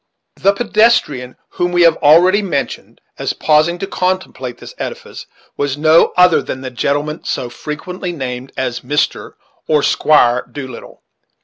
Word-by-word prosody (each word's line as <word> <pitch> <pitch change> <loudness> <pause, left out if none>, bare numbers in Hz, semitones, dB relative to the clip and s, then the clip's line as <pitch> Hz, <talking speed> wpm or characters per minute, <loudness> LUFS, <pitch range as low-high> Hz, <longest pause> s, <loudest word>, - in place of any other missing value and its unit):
The 200 - +3
pedestrian 200 - +1
whom 175 0 -2
we 175 0 +3
have 165 -1 +5
already 175 +7 +5
mentioned, 170 -9 -4 0.2
as - - -2
pausing 155 +3 +2
to 195 - -4
contemplate 180 -11 -3
this - - -11
edifice, - - -7 0.3
was 145 -1 -2
no 155 +2 +4
other 180 -2 +5
than 130 - -6
the 130 -1 -6
gentleman 145 +5 -2
so 120 -1 -3
frequently 180 +7 -6
named 130 -4 -6
as 125 -2 -2
Mr. 145 +4 -2 0.3
or 150 -2 +2
Squire 125 -5 +3
Doolittle. 130 -4 -9
150 Hz, 140 wpm, -16 LUFS, 130-180 Hz, 0.3 s, have